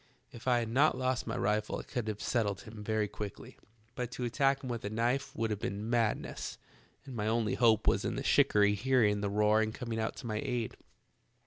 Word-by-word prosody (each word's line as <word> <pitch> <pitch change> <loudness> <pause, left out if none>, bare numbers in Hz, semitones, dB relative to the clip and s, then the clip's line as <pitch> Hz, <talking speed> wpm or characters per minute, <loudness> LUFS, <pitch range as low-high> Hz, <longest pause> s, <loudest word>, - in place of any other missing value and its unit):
If 120 +2 -11
I 125 -1 +4
had 115 -2 -1
not 135 +3 +3
lost 130 -1 -1
my 115 +2 -2
rifle 105 0 0
I - - -6
could 120 -5 -4
have 105 -1 -3
settled 105 -5 0
him 110 -3 -10
very 110 0 0
quickly, 100 -1 -7 0.4
but 125 -1 -3
to 125 - -4
attack 135 +3 +1
him - - -5
with 120 -1 -4
a 100 - -2
knife 120 +5 -1
would 115 -1 -1
have 105 - -2
been 105 +3 -3
madness, 115 -3 -1 0.5
and 135 -3 -8
my 105 -1 -1
only 110 -2 +1
hope 115 -3 +4
was - - +3
in - - -1
the - - -3
shikarry 105 0 +4
hearing 105 -2 +2
the 100 - 0
roar 105 +1 +3
and 110 0 -1
coming 115 -3 -4
to 110 +2 -3
my 110 -2 -2
aid. 120 -3 -2
115 Hz, 215 wpm, -32 LUFS, 105-125 Hz, 0.5 s, I